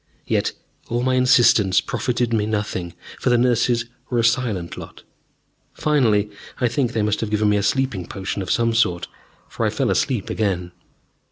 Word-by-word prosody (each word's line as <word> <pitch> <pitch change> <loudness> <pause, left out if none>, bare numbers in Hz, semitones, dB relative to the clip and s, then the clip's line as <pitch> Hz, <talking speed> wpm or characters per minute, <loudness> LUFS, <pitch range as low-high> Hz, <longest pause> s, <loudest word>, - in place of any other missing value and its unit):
Yet - - 0 0.4
all 120 +1 -1
my 130 0 +1
insistence 120 -6 +4
profited 120 0 -1
me 105 -2 +1
nothing, 100 -5 -3 0.2
for - - 0
the 120 - +4
nurses 120 -1 +2 0.2
were 125 - -1
a 115 - +2
silent 115 -7 0
lot. - - -11 0.7
Finally, 110 -9 +2 0.3
I 125 - +2
think, 120 +1 -1
they 110 -3 0
must 105 0 0
have 110 - -2
given 105 0 +2
me 105 - +3
a - - +1
sleeping 105 -4 -1
potion 95 +1 -4
of 90 - -5
some 115 -1 +2
sort, 90 -7 +1 0.4
for - - -4
I - - +2
fell - - 0
asleep - - 0
again. 90 -5 -1
115 Hz, 175 wpm, -21 LUFS, 100-120 Hz, 0.7 s, insistence